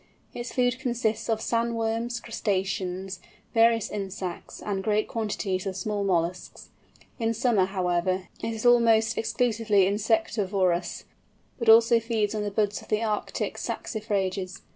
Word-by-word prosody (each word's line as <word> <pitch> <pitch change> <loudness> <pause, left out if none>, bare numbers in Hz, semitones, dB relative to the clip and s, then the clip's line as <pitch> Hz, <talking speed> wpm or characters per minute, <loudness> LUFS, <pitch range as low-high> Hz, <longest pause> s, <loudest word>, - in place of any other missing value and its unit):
Its 240 0 -5
food 250 0 +1
consists 230 -3 -1
of 220 -1 +1
sand 235 0 0
worms, 230 +1 -1
crustaceans, 190 -4 -2 0.3
various 230 -1 +4
insects 190 -3 -5
and 195 -2 -3
great 215 +1 +1
quantities 200 -4 -2
of 190 - -3
small 205 +2 -2
molluscs. 180 -1 -2 0.5
In 225 0 0
summer, 225 -5 +3
however, 185 -1 -1
it 230 - -2
is 225 +1 -5
almost 225 -2 +5
exclusively 225 -4 +2
insectivorous, 200 -4 0 0.6
but 235 -2 +1
also 230 +1 +7
feeds 225 -2 -1
on 215 - -2
the 205 - -1
buds 205 0 0
of - - -15
the 215 +1 0
Arctic 215 -2 -2
saxifrages. 195 -4 -3
215 Hz, 135 wpm, -26 LUFS, 190-230 Hz, 0.6 s, also